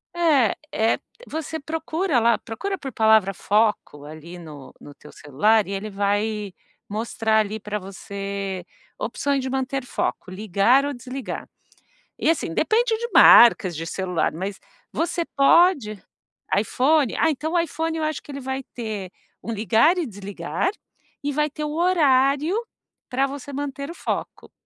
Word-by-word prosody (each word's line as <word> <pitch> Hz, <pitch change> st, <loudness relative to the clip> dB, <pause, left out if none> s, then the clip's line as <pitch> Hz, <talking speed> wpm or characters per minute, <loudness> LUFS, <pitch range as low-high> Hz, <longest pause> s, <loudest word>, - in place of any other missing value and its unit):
É, 300 Hz, -10 st, +3 dB, 0.2 s
é. 220 Hz, +1 st, +1 dB, 0.3 s
Você 320 Hz, 0 st, -4 dB
procura 320 Hz, 0 st, -1 dB
lá 230 Hz, 0 st, +3 dB
procura 385 Hz, -, -5 dB
por 270 Hz, -5 st, -7 dB
palavra 220 Hz, -3 st, +4 dB
foco 205 Hz, -9 st, 0 dB
ali 155 Hz, +3 st, -10 dB
no 150 Hz, -5 st, -11 dB
no 145 Hz, -, -12 dB
teu -, -, -15 dB
celular 205 Hz, +10 st, +2 dB
e 195 Hz, -, -6 dB
ele 200 Hz, +2 st, -4 dB
vai 205 Hz, 0 st, -1 dB, 0.3 s
mostrar 220 Hz, +1 st, 0 dB
ali 215 Hz, 0 st, -1 dB
pra 210 Hz, +1 st, -4 dB
você 195 Hz, -1 st, -5 dB, 0.4 s
opções 275 Hz, +4 st, -1 dB
de 260 Hz, -, -4 dB
manter 265 Hz, 0 st, -2 dB
foco, 210 Hz, -, -3 dB
ligar 210 Hz, +7 st, +2 dB
ou 285 Hz, -, -2 dB
desligar, 255 Hz, +1 st, -7 dB, 0.7 s
e -, -, 0 dB
assim, 320 Hz, -, +1 dB
depende 445 Hz, -, +2 dB
de 475 Hz, +1 st, -3 dB
marcas 200 Hz, -7 st, +8 dB
de 165 Hz, +2 st, -5 dB
celular, 180 Hz, -1 st, -1 dB
mas 190 Hz, +4 st, -5 dB, 0.3 s
você 340 Hz, 0 st, -1 dB
pode 280 Hz, -, +4 dB, 0.7 s
iPhone? 265 Hz, +5 st, +2 dB
Ah, 320 Hz, -, +3 dB
então 310 Hz, +3 st, -3 dB
o 350 Hz, -, +3 dB
iPhone 325 Hz, 0 st, -2 dB
eu 315 Hz, -, -1 dB
acho 310 Hz, -2 st, -2 dB
que -, -, -13 dB
ele 280 Hz, 0 st, -6 dB
vai 265 Hz, +1 st, -4 dB
ter 215 Hz, -6 st, -5 dB, 0.3 s
um -, -, -6 dB
ligar 225 Hz, -, +3 dB
e 335 Hz, -, -1 dB
desligar 200 Hz, -, -3 dB, 0.5 s
e 290 Hz, 0 st, -1 dB
vai 300 Hz, +1 st, +1 dB
ter 300 Hz, +2 st, -5 dB
o 300 Hz, -, -3 dB
horário 300 Hz, -2 st, +3 dB, 0.5 s
para 270 Hz, +2 st, +1 dB
você 280 Hz, 0 st, -8 dB
manter 280 Hz, +1 st, -4 dB
o -, -, -7 dB
foco. -, -, -5 dB
240 Hz, 155 wpm, -23 LUFS, 200-295 Hz, 0.7 s, marcas